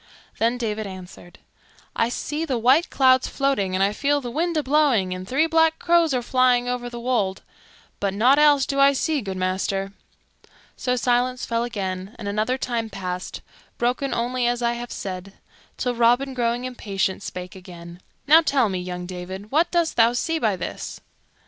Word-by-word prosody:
Then 230 +2 +2
David 215 -3 -3
answered, 185 -2 -11 0.6
"I 230 - +1
see 300 +5 -3
the 270 -6 -1
white 260 +9 +3
clouds 260 -1 +4
floating 270 -10 0
and 190 - +2
I 200 +1 +1
feel 290 +4 +1
the 245 -3 -6
wind 335 +4 -1
a 305 - +1
blowing 260 -10 +2
and 185 0 -7
three 275 +8 +2
black 325 0 +3
crows 340 -2 +3
are 250 -2 0
flying 250 -1 +2
over 245 -1 -3
the 240 0 -7
wold; 230 -6 -1 0.6
but 200 -1 0
nought 245 +8 +4
else 290 -3 +5
do 275 - -2
I 275 0 +6
see, 300 +1 0
good 190 -3 -5
master." 195 +1 -2 0.8
So 250 -1 -1
silence 250 +1 0
fell 230 0 -1
again 195 -2 -4
and 215 - -7
another 215 +5 0
time 235 -3 -2
passed, 185 -2 -5 0.4
broken 250 +3 0
only 245 +1 0
as 240 0 -1
I 235 0 +2
have 240 0 -7
said, 190 0 -6 0.4
till 250 -1 -1
Robin, 245 +3 +2
growing 240 0 -1
impatient, 200 -7 -2
spake 180 -2 -7
again. 175 -1 -11 0.2
"Now 315 +3 +7
tell 275 -8 +2
me, 185 -1 -2
young 180 0 -5
David, 185 +3 -8
what 320 +5 +3
dost 340 -2 0
thou 230 0 +5
see 325 +6 -1
by 215 -8 +1
this?" 180 - -6
240 Hz, 180 wpm, -23 LUFS, 195-270 Hz, 0.8 s, Now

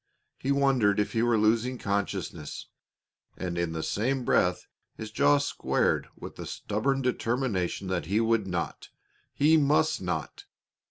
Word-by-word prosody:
He 135 - -1
wondered 130 -8 +3
if 105 - 0
he 115 - 0
were 120 -1 +3
losing 115 +4 +2
consciousness, 95 -7 -3 0.7
and 90 -2 -4
in 85 -1 -1
the 80 -1 -3
same 125 +4 -1
breath 90 0 +2 0.3
his 110 -1 -7
jaw 145 +6 +4
squared 145 0 0
with - - -10
the - - -6
stubborn 135 +6 -1
determination 115 -7 -1
that 85 -5 -2
he 100 +4 +1
would 115 -3 +1
not 90 -2 -4 0.5
he 155 +3 +5
must 155 -1 +2
not! 90 -4 -4
110 Hz, 145 wpm, -28 LUFS, 95-135 Hz, 0.7 s, he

